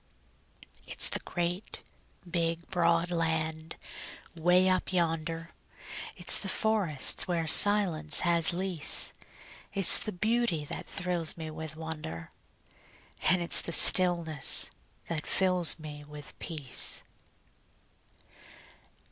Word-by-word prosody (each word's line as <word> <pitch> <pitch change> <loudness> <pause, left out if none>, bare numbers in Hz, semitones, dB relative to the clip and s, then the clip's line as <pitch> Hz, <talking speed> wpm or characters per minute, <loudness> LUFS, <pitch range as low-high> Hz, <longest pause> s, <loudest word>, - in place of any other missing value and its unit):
It's - - +4
the - - -3
great, 175 +3 -6 0.4
big, 170 -1 -4
broad 170 -1 -1
land 160 -1 -4 0.6
'way 180 +3 +1
up 185 0 -2
yonder, 165 -1 -4 0.6
It's - - +4
the 195 - -5
forests 195 -12 -1
where 170 -2 -3
silence 165 -4 +4
has 170 -2 +3
lease; 180 -3 +2 0.6
It's 195 -3 +6
the 215 - -6
beauty 210 -5 -3
that - - -9
thrills 175 -4 -3
me 160 -1 -9
with 155 0 -10
wonder, 155 - -9 0.9
It's 175 -2 +3
the - - -7
stillness 170 -5 +4 0.4
that 160 -2 -6
fills 180 -4 0
me 150 -2 -12
with 150 0 -11
peace. 145 -7 0
170 Hz, 100 wpm, -27 LUFS, 160-180 Hz, 0.9 s, It's